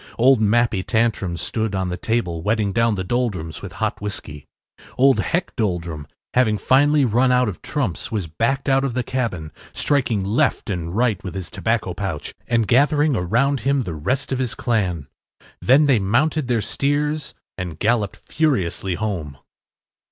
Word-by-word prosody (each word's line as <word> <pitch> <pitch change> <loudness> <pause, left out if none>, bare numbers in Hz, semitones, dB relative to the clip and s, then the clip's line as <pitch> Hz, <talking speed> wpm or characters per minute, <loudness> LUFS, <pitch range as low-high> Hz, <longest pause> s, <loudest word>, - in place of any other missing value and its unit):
Old 125 0 +5
Mappy 110 -1 +2
Tantrum 110 -5 0
stood 110 +5 -2
on 95 -1 -1
the 90 - -2
table 90 -7 -1
wetting 105 +1 0
down 115 0 +2
the 95 - -3
Doldrums 95 - -2
with - - -8
hot - - -2
whiskey. 75 -8 -6 0.5
Old 135 +1 +5
Heck 175 +1 -1
Doldrum, 85 - -2 0.3
having 115 -4 +3
finally 145 +4 +4
run 125 +3 +3
out 125 -1 +3
of 100 - -5
trumps, 130 - -3
was 105 -5 -1
backed 115 - -1
out 135 0 +3
of 130 -4 -2
the 125 - 0
cabin, 110 -12 -3 0.2
striking 125 -9 0
left 115 +1 +1
and 85 -1 -4
right 115 -6 +1
with 95 - -6
his 95 -3 -6
tobacco 110 -5 -1
pouch, 95 -5 -4
and 115 -2 +1
gathering 145 +4 +3
around 120 +10 +1
him 135 +3 +1
the 90 - -5
rest 125 - -2
of 130 - 0
his 125 -3 -2
clan. 95 - -1 0.6
Then 135 +5 +5
they 135 -6 +4
mounted 130 +9 +1
their 120 -3 +1
steers 145 +4 -1 0.2
and 90 -4 -5
galloped 105 -1 0
furiously 95 - 0
home. 85 -9 -4
115 Hz, 165 wpm, -21 LUFS, 95-130 Hz, 0.6 s, Old